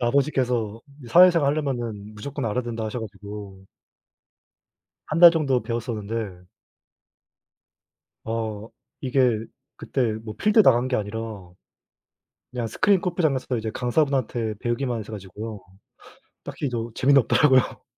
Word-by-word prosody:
아버지께서 125 -4 0 0.2
이 - - -11
사회생활 170 0 +6
하려면 120 -8 -4
무조건 135 +5 -5
알아야 115 +3 -1
된다 115 -2 -4
하셔 110 +3 -4
가지고 100 -2 -9 1.4
1 155 - -2
달 175 - +11
정도 135 -6 +1
배웠었는데 110 -5 -4 1.8
어 110 -1 -4 0.3
이게 125 -4 +1 0.3
그때 120 -5 -1
뭐 110 -2 -6
필드 210 - +4
나간 125 -5 +4
게 130 - +1
아니라 105 +2 -3 1.3
그냥 125 -2 -3
스크린 195 - +2
골프장에서부터 155 -9 0
이제 110 0 -3
강사분한테 125 -4 0
배우기만 120 0 -1
했어 110 +1 -9
가지고요. 105 +2 -7 0.8
딱히 145 - -4
저 115 -1 -4
재미는 140 +1 +5
없더라고요. 130 -2 +3
120 Hz, 295 characters per minute, -24 LUFS, 110-135 Hz, 1.8 s, 달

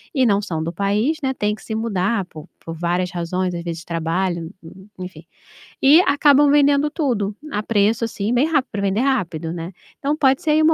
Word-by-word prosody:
e 260 - +3
não 205 -3 +2
são 160 -5 -3
do 170 +2 -4
país, 210 - 0
né, 265 - +1
têm 210 -3 -1
que - - -17
se 220 - -5
mudar 205 -2 -1
por 155 -4 -12 0.2
por 165 - -6
várias 175 +2 -1
razões, 180 +1 -2
às 170 - -5
vezes 170 -1 -5
de - - -16
trabalho, 170 +1 -2 0.5
enfim, 185 0 -9 0.6
e 295 +6 +7
acabam 285 -2 +4
vendendo 290 0 +4
tudo, 225 - -1 0.2
a 210 +1 -2
preço, 215 +1 +1
assim 210 +1 -3
bem 250 +5 +3
rápido 285 -5 0
para 205 -2 -3
vender 200 +2 0
rápido, 170 - -1
né? 170 +2 -6 0.3
Então 290 +2 -1
pode 270 +1 +3
ser 320 - -2
aí 310 - +4
uma 320 +1 +5
205 Hz, 205 wpm, -20 LUFS, 175-270 Hz, 0.6 s, e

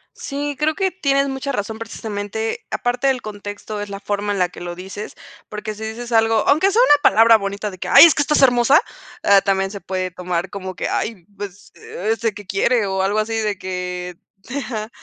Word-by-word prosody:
Sí, 290 0 -4
creo 310 +1 +1
que 380 -1 0
tienes 280 -6 +1
mucha 270 +1 -3
razón, 220 -2 -4
precisamente 220 -1 -5
aparte 245 +2 -1
del 260 -2 +1
contexto 205 0 -6
es 205 - -6
la 200 0 -6
forma 205 0 -2
en 200 - -1
la 180 -1 +1
que - - -12
lo 175 0 -5
dices 195 +4 -8 0.3
porque 215 0 -5
si 215 +1 -9
dices 230 +2 -6
algo, 225 -1 +3
aunque 310 +7 +4
sea 450 +4 +4
una 290 -11 +5
palabra 225 -2 +6
bonita 200 0 -4
de 185 - -12
que - - -4
¡ay, 280 - +10
es 330 - +6
que 290 - 0
estás 290 -1 +2
hermosa! 245 +3 +5 0.4
Ah, 200 -1 +6
también 195 -1 0
se 200 -1 -8
puede 185 0 -3
tomar 180 0 -3
como 190 -2 -6
que - - -3
ay, 205 -7 -3
pues, 200 -1 -9
¿este 225 +3 -2
que 205 0 -10
quiere? 205 +4 +1
o 190 -1 -1
algo 200 +2 0
así 215 +1 -1
de 210 -3 -1
que 180 -1 -5 0.4
ajá. 220 -3 -5
215 Hz, 210 wpm, -20 LUFS, 195-245 Hz, 0.4 s, ay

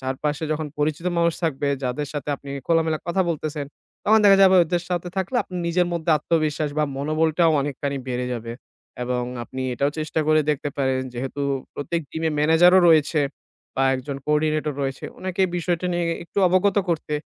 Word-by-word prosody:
চারপাশে 145 +4 -2
যখন 155 0 -3
পরিচিত 155 +3 -1
মানুষ 170 -1 +2
থাকবে 145 -3 0 0.2
যাদের 130 +3 -2
সাথে 145 0 -5
আপনি 140 - -11 0.2
খোলামেলা 160 -2 +2
কথা 190 +2 +2
বলতেছেন, 150 -2 -3 0.4
তখন 220 +1 +5
দেখা 195 -1 +8
যাবে 190 -1 +7
ওদের 175 +1 -1
সাথে 180 -1 -2
থাকলে 190 +6 -1
আপনার 180 -1 -6
নিজের 175 +1 +2
মধ্যে 170 -1 -1
আত্মবিশ্বাস 155 -1 0
বা 150 - +3
মনোবলটাও 160 +3 +2
অনেকখানি 140 0 -3
বেড়ে 125 0 -2
যাবে। 115 0 -6 0.5
এবং 125 0 -1 0.2
আপনি 130 +2 -6
এটাও 140 +4 +1
চেষ্টা 155 +1 -1
করে 155 0 +4
দেখতে 145 0 -2
পারেন 130 -1 +1
যেহেতু 135 +3 -4 0.3
প্রত্যেক 165 +4 -2
gym-এ 160 0 -1
manager-ও 170 +5 +6
রয়েছে 155 -1 +4 0.5
বা 135 - 0
একজন 135 +2 -5
coordinator 150 -1 +1
রয়েছে, 135 -1 -4
ওনাকে 185 0 -1
বিষয়টা 175 +1 -1
নিয়ে 175 0 0 0.2
একটু 185 - -5
অবগত 185 +3 +2
করতে, 155 -3 -1
155 Hz, 165 wpm, -23 LUFS, 140-170 Hz, 0.5 s, দেখা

